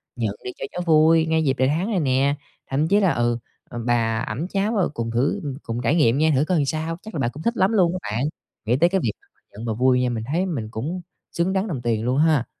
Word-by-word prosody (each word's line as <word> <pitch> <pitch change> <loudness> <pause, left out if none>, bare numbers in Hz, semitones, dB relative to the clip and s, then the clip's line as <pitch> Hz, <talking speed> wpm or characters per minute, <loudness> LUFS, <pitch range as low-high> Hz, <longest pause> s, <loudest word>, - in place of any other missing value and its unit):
nhận 110 -4 -2
đi 125 - -4
cho - - -4
cháu 180 - -4
vui, 160 0 +5
ngay 160 0 +1
dịp 135 -3 +2
đầy 130 - +3
tháng 170 +9 0
này 190 - +1
nè." 140 0 +2 0.3
Thậm 145 +4 +1
chí 205 +3 +4
là, 190 -4 +3
ừ, 120 0 +1 0.3
ừm, 120 -1 -6
bà 115 -2 +1
ẵm 160 +7 -3
cháu, 200 +4 -1
ừ, 185 - +2
cùng 115 -4 -3
thử 120 +5 0 0.2
cùng 115 +1 -4
trải 125 +7 +2
nghiệm 130 -5 +3
nha, 155 +1 +3
thử 140 +4 +2
coi 180 0 +1
làm 145 - +2
sao, 160 +3 -2
chắc 220 - -10
là 150 - -2
bà 120 - +1
cũng 150 +5 -9
thích 235 0 0
lắm 190 +4 +3
luôn 180 -5 +4
á - - -6
bạn. 115 +5 -1 0.4
Nghĩ 115 +3 +2
tới 170 +4 +4
cái 190 -1 +1
việc 110 - +1 0.4
nhận 110 +3 -8
và 115 - -1
vui 125 +2 +3
nha, 125 - +1
mình 115 -2 -3
thấy 180 +4 +1
mình 125 - -3
cũng 155 +12 -4 0.3
xứng 175 +3 0
đáng 195 +3 0
đồng 140 -10 -4
tiền 115 -2 0
luôn 130 +2 +1
ha. 155 -5 +3
145 Hz, 270 wpm, -23 LUFS, 120-170 Hz, 0.4 s, vui